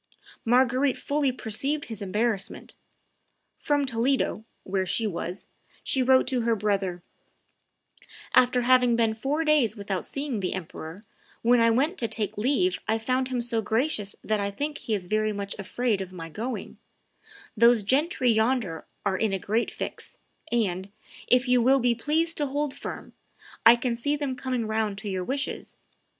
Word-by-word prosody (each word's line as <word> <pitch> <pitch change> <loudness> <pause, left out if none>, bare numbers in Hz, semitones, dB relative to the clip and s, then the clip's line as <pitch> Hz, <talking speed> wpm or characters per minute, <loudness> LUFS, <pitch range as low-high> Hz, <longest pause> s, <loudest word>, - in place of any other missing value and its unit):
Marguerite 255 +3 +3
fully 285 -2 0
perceived 265 +5 -1
his 225 -3 -7
embarrassment. 205 +1 -2 0.9
From 290 -1 +1
Toledo, 245 -2 0 0.2
where 190 -1 -1
she 220 +5 +1
was, 180 -2 -4 0.4
she 265 - +1
wrote 260 +1 +5
to 255 -3 0
her 230 0 +2
brother, 195 -4 -1 1.3
"After 250 0 +5
having 250 -1 +5
been 225 -1 +2
four 275 +8 -1
days 295 -8 +3
without 200 -3 -3
seeing 275 -5 -3
the 185 - -2
emperor, 170 +2 -8 0.4
when 240 +1 +5
I 230 0 +5
went 280 +11 +1
to 230 - 0
take 220 -1 -3
leave 285 - +1
I 220 +1 +2
found 255 +3 0
him 255 -2 -1
so 230 -1 -1
gracious 220 -2 -1
that 215 -1 0
I 200 0 -1
think 290 +9 -4
he 220 - -1
is 190 -3 -4
very 215 +3 +1
much 200 -1 -4
afraid 215 +1 -1
of 190 -1 -6
my 165 -3 -8
going; 230 +10 -5 0.8
those 235 -1 +5
gentry 265 - +2
yonder 220 -6 0 0.2
are 190 - +1
in 220 -2 +1
a 195 - 0
great 220 +5 0
fix, - - -7 0.3
and, 195 -5 0 0.4
if 250 +1 +3
you 250 -1 +4
will 265 +3 +4
be 245 -1 +3
pleased 315 +8 0
to 290 - 0
hold 285 +1 -2
firm, - - -7 0.5
I 235 - +10
can 240 0 -1
see 285 +5 0
them 285 -3 -3
coming 255 -2 -2
round 220 -2 -1
to 205 +1 -5
your 185 -1 -2
wishes. 270 +8 -3
235 Hz, 165 wpm, -26 LUFS, 205-260 Hz, 1.3 s, I